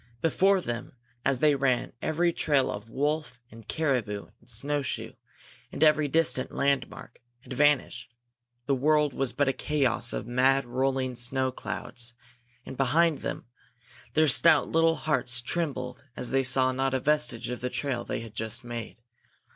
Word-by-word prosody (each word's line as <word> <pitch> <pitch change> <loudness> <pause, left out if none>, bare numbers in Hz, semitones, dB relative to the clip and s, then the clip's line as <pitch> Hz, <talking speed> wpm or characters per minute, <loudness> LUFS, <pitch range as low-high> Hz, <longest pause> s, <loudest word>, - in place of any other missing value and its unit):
Before 190 +4 +3
them 120 -7 -5 0.3
as 135 -1 +1
they 150 +3 +4
ran 135 -3 0
every 170 +2 +1
trail 145 -5 +1
of 105 +2 -7
wolf 145 -1 -2
and 115 -1 -14
caribou 120 -11 -1
and 115 - -19
snow 145 +6 -1
shoe, 130 - -4 0.6
and 145 - -1
every 155 -1 +4
distant 155 -3 +1
landmark, 140 -3 -2 0.2
had 130 - -9
vanished; 135 -3 +1 0.5
the 140 - +1
world 150 +1 +2
was 135 -1 0
but 140 +3 0
a 135 - +2
chaos 130 -4 0
of - - -4
mad 130 +3 +2
rolling 130 +1 -1
snow 130 +2 +1
clouds; 120 -1 -6 0.5
and 130 - -8
behind 155 +4 +2
them - - -5 0.7
Their 155 0 +4
stout 160 +4 +6
little 165 0 +3
hearts 135 -6 0
trembled 130 -2 -3
as 125 - -4
they 135 0 +3
saw 130 0 +3
not 135 +1 0
a - - +1
vestige 135 -5 0
of 125 - -5
the 125 - -2
trail 130 -2 -2
they - - -4
had 115 -2 -10
just 110 +3 -4
made. 120 -1 -7
135 Hz, 160 wpm, -27 LUFS, 120-150 Hz, 0.7 s, stout